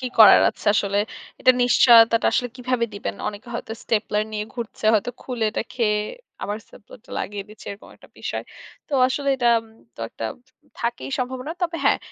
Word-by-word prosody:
কি 255 - -3
করার 215 -3 +9
আছে - - -15
আসলে। 200 -1 +1 0.4
এটা 255 - +6
নিশ্চয়তাটা 230 -2 +6
আসলে 245 - +1
কীভাবে 250 -1 0
দিবেন। 200 - -4
অনেকে 210 +4 -9
হয়তো 225 - -5
স্টেপলার 210 -1 0
নিয়ে 210 -1 -2
ঘুরছে, 235 -3 -7
হয়তো 215 +3 +1
খুলে 245 -3 -3
এটা - - -2
খেয়ে, 210 -4 +1 0.4
আবার 205 +1 -2
স্টেপলারটা 215 +2 -16
লাগিয়ে 200 -1 -4
দিচ্ছে 215 0 -14
এরকম 200 - -10
একটা - - -18
বিষয়। - - -4 0.4
তো - - -14 0.2
আসলে 280 +2 -2
এটা 245 -2 +2 0.5
তো - - -10
একটা 115 - -7 0.6
থাকেই 235 +3 -3
সম্ভাবনা। 255 +4 -3
তবে 335 -1 0
হ্যাঁ, - - +4
230 Hz, 170 wpm, -23 LUFS, 210-250 Hz, 0.6 s, করার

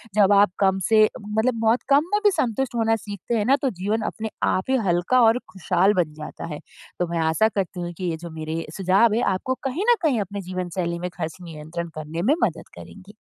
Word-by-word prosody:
जब 205 -1 +5
आप 200 -1 +5
कम 190 -1 +2
से 220 -1 +6 0.2
मतलब 220 +3 0
बहुत 225 +2 +2
कम 280 +1 +5
में 415 - +4
भी 415 - +7
संतुष्ट 250 - -1
होना 225 -1 +2
सीखते 205 +2 -5
है 210 - 0
ना - - +7
तो 270 - +3
जीवन 210 +4 0
अपने 220 0 -5 0.2
आप 185 +6 -1
ही 265 - +4
हल्का 175 +9 +3
और 225 +2 +4
खुशहाल 190 +1 +2
बन 155 -3 -5
जाता 150 - -7
है। - - -8 0.4
तो 180 - 0
मैं 170 - 0
आशा 190 +8 +3
करती 190 -3 -3
हूँ 175 0 -5
कि 180 -2 -2
ये 160 - -4
जो - - -6
मेरे 160 +1 -4
सुझाव 195 +4 +3
है 235 - +1
आपको 260 +7 -2
कहीं 285 +9 -2
न - - +6
कहीं 280 -8 +2
अपने 200 +1 -5
जीवन 185 -1 -4
शैली 170 -1 -1
में 180 - -3
ख़र्च 160 +2 -4
नियंत्रण 165 0 -6
करने 155 +2 -4
में 265 - +3
मदद - - -1
करेंगे। 200 +1 -12
200 Hz, 225 wpm, -23 LUFS, 175-225 Hz, 0.4 s, भी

